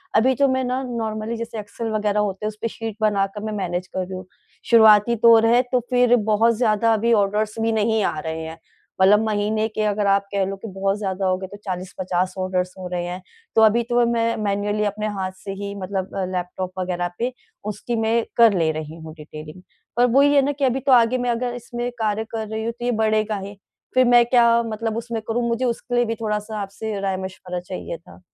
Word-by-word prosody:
अभी 255 +4 +4
तो 280 +2 +3
मैं 260 0 0
ना, 255 +1 -1
नॉर्मली 225 -2 -3
जैसे 230 -1 -5
एक्सेल 210 +2 -6
वग़ैरह 210 -1 0
होते 205 0 -2
हैं - - +1
उसपे 215 +2 -4
शीट 225 -1 -6
बना 205 -2 +2
कर 210 - -5
मैं 215 -1 -3
मैनेज़ 180 -1 -3
कर 185 - -2
रही 190 - -9
हूँ। 185 - -7 0.4
शुरुआती 220 0 +6
तौर 225 0 +6
है 240 +2 +5
तो 250 - +3
फिर 245 -1 +4 0.2
बहुत 230 +2 +4
ज़्यादा 225 -1 +2
अभी 230 +2 +2
ऑर्डर्स 210 +1 +1
भी 225 0 +1
नहीं 220 0 +1
आ 155 - -1
रहे 160 +1 -4
हैं। 160 +1 -7 0.4
मतलब 205 +2 +6
महीने 215 +1 0
के 215 0 -4
अगर 205 -1 0
आप 200 0 +3
कह 195 -1 +1
लो 195 +1 -4
कि, 210 +3 -9
बहुत 195 +1 -1
ज़्यादा 195 -2 -2
हो 185 0 +2
गए 190 0 -6
तो 205 - -11
40-50 185 0 -2
ऑर्डर्स 185 -1 -1
हो 185 -1 -6
रहे 175 - -1
हैं। 180 +1 -5 0.3
तो 220 - +5
अभी 225 +2 +5
तो 240 0 +3
मैं 230 0 +1
मैनुअली 205 +1 0
अपने 210 +1 -2
हाथ 185 0 -2
से 195 - -4
ही 200 0 -4
मतलब 190 0 -4
अ, 190 - -1
लैपटॉप 180 0 -4
वग़ैरह 175 -1 -2
पे 245 +2 -1 0.4
उसकी 240 +3 -4
मैं 225 +1 +1
कर 230 -2 +7
ले 160 -2 +2
रही 155 0 -6
हूँ 160 -1 -9
डिटेलिंग। 155 +2 -10 0.4
पर 245 - +5
वो 275 +3 +5
ही 285 0 +4
है 280 - +6
ना 290 - +1
कि 280 -1 -1
अभी 260 +1 +1
तो 270 +1 0
आगे 245 0 +5
मैं 245 0 -1
अगर 240 +1 -1
इसमें 240 0 -4
कार्य 215 0 0
कर 220 -1 -3
रही 220 +1 -4
हूँ, 230 - -1
तो 240 +1 -7
ये 245 - +2
बढ़ेगा 215 -1 +1
ही। 200 +1 -8 0.4
फिर 255 0 +5
मैं 240 0 +6
क्या 235 -1 +4
मतलब 225 0 -3
उसमें 230 -1 -4
करूँ, 235 +1 0
मुझे 235 +2 0
उसके 245 +1 -2
लिए 240 0 +3
भी 230 0 -2
थोड़ा-सा 215 -1 -3
आपसे 200 +1 -5
राय-मशवरा 190 -2 -4
चाहिए 180 -1 -6
था 170 - -17
215 Hz, 225 wpm, -22 LUFS, 195-235 Hz, 0.4 s, कर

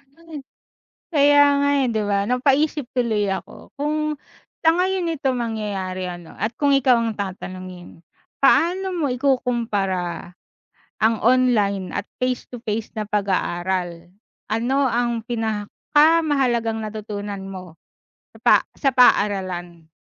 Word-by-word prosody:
Ay, 325 -3 -10 0.7
kaya 290 0 +6 0.2
nga, 285 - +2 0.2
eh, - - 0
'di 220 - 0
ba, 200 0 +2
napaisip 270 +3 +1
tuloy 215 -5 +1
ako 190 - -6
kung 305 +1 -1 0.5
sa 325 - +8
ngayon 365 -2 0
ito 275 -3 -1
mangyayari 195 -5 -3
ano, 175 -2 -9
at 225 +2 -4
kung 285 -1 +2
ikaw 260 -3 +4
ang 230 -1 -1
tatanungin, 185 -3 -7 0.4
paano 360 +7 +3
mo 285 -6 0
ikukumpara, 220 -10 -1 0.7
ang 225 +1 +4
online 220 -6 +2
at - - -3 0.2
face 255 -1 -1
to 245 -2 -10
face 220 +1 -4
na 215 - -2
pag-aaral? 180 -3 -1 0.4
Ano 250 +6 +1
ang 235 -1 -1
pinakamahalagang 240 +2 +1
natutunan 210 -2 -6
mo 185 -3 -9 0.6
sa - - -15
pa - - +6 0.2
sa 275 - +1
paaralan? 185 -8 +2
225 Hz, 120 wpm, -22 LUFS, 195-275 Hz, 0.7 s, sa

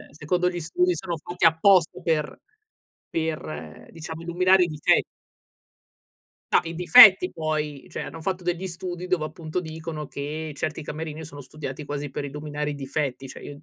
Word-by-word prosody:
eh, - - -21
secondo 175 +4 0
gli 175 -1 -4
studi 360 - +1
sono 175 - -4
fatti 175 +3 -4
apposta 165 +1 +4
per 155 -3 -1 0.7
per, 155 - -5
diciamo, 160 0 -8
illuminare 180 +2 +4
i - - -1
dife 150 -3 +2 1.5
No, - - +6
i 165 0 -6
difetti 190 0 +8
poi 155 -3 -3
cioè, - - -5
hanno 160 +3 -8
fatto 185 +1 -3
degli 180 +2 -2
studi 180 0 -6
dove, 170 -4 +1
appunto, 155 +1 -5
dicono 160 -2 -6
che 150 +3 -5
certi 155 +1 -3
camerini 155 +1 -6
sono 145 -2 -10
studiati 145 +1 -7
quasi 145 0 -4
per 140 - -4
illuminare 150 +1 -4
i - - -4
difetti, 135 -1 -3
cioè, - - -10
io 145 - -8
d 150 - -18
160 Hz, 165 wpm, -25 LUFS, 150-175 Hz, 1.5 s, difetti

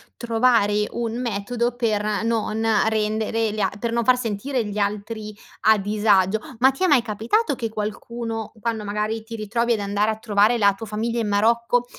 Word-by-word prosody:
trovare 225 -3 +2
un 235 0 -3
metodo 235 +1 -2
per 215 -3 0
non 225 -1 -1 0.2
rendere 220 0 0
gli 215 - -5
a 195 - +2
per 235 +1 -2
non 235 0 0
far 255 +1 +5
sentire 240 +2 -2
gli 205 0 -5
altri 210 +1 -3 0.3
a 220 0 +5
disagio. 205 0 +2 0.2
Ma 260 +2 +6
ti 270 +7 -4
è - - +4
mai 285 -7 +5
capitato 235 - 0
che 230 -3 -3
qualcuno, 225 +1 -5
quando 225 -2 -2
magari 210 +2 -2
ti 230 +1 -8
ritrovi 230 +2 0
ad 220 - -1
andare 205 +2 0
a 215 - -5
trovare 215 +1 +2
la 200 -3 +4
tua 195 +3 -8
famiglia 225 +2 -2
in 225 - -1
Marocco, 235 +4 +2
220 Hz, 180 wpm, -23 LUFS, 210-235 Hz, 0.3 s, Ma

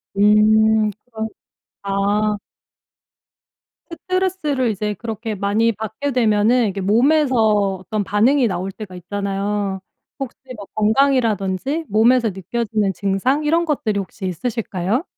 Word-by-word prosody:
음. 215 +1 +4
그럼 220 -2 -5 0.6
아. 205 +2 0 1.6
스트레스를 365 -8 -1
이제 210 +1 -2
그렇게 225 0 -5
많이 210 +4 +1
받게 220 +7 -4
되면은 225 0 +3
이게 195 0 -4
몸에서 260 +7 +3 0.4
어떤 205 +3 -3
반응이 240 +6 +3
나올 190 0 -3
때가 190 -3 -9
있잖아요. 200 +1 -3 0.4
혹시 270 -2 -5 0.2
뭐 205 - -9
건강이라든지 230 - +1
몸에서 230 +2 +4
느껴지는 205 +1 -2
증상 205 - 0
이런 330 +3 +2
것들이 225 -10 -1
혹시 195 +1 -7
있으실까요? 205 - -2
215 Hz, 275 characters per minute, -20 LUFS, 200-250 Hz, 1.6 s, 음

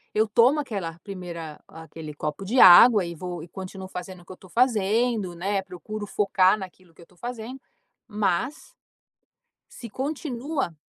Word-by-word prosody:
eu 220 +1 +3
tomo 245 +7 +4
aquela 195 - -4
primeira 170 -6 -8
aquele 160 -1 -10
copo 150 +5 -4
de 245 +6 +1
água 195 +2 +9
e 170 - -6
vou 175 0 -6
e - - -11
continuo 190 +1 -8
fazendo 180 0 -8
o - - -20
que - - -12
eu 185 - -10
tô 185 - -17
fazendo, 220 -3 +1
né, 195 +3 -1
procuro 200 +3 -8
focar 195 -1 +3
naquilo 185 -3 -11
que - - -18
eu - - -12
estou 180 +1 -24
fazendo, 245 +3 -7 0.5
mas 210 +5 -2 1.0
se 235 - -10
continua 270 - -4
195 Hz, 160 wpm, -25 LUFS, 175-230 Hz, 1.0 s, água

